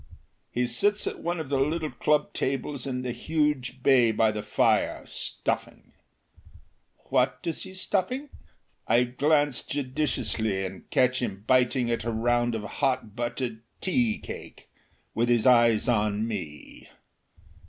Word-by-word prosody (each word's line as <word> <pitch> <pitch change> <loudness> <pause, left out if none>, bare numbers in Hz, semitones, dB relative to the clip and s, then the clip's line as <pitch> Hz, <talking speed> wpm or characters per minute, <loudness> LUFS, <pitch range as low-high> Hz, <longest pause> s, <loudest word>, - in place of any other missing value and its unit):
He 125 +1 0
sits 205 - +1
at - - -4
one 175 0 -2
of 155 -4 -5
the 140 -1 +1
little 155 +3 0
club 150 0 +1
tables 135 0 -2
in 125 -1 -3
the 125 - -2
huge 135 -1 -1
bay 125 -4 +5
by 110 0 +3
the 105 0 -4
fire, 105 - +1
stuffing. - - -4 1.2
What 130 -1 +2
is 165 -2 -2
he 190 0 -8
stuffing? 205 +10 -1 0.6
I 120 - +4
glance 145 +2 +2
judiciously 125 -8 -1
and 95 0 -9
catch 130 -2 +2
him 100 -5 -4
biting 125 -1 +2
at 115 - -1
a 115 - -2
round 120 +1 +1
of 110 - -4
hot 125 -1 -1
buttered 120 -1 -3 0.2
tea 120 - +1
cake, - - -10 0.5
with 120 +2 +1
his 120 -2 +3
eyes 120 -2 +5
on 105 -2 +1
me. 90 -10 -7
125 Hz, 140 wpm, -27 LUFS, 115-145 Hz, 1.2 s, bay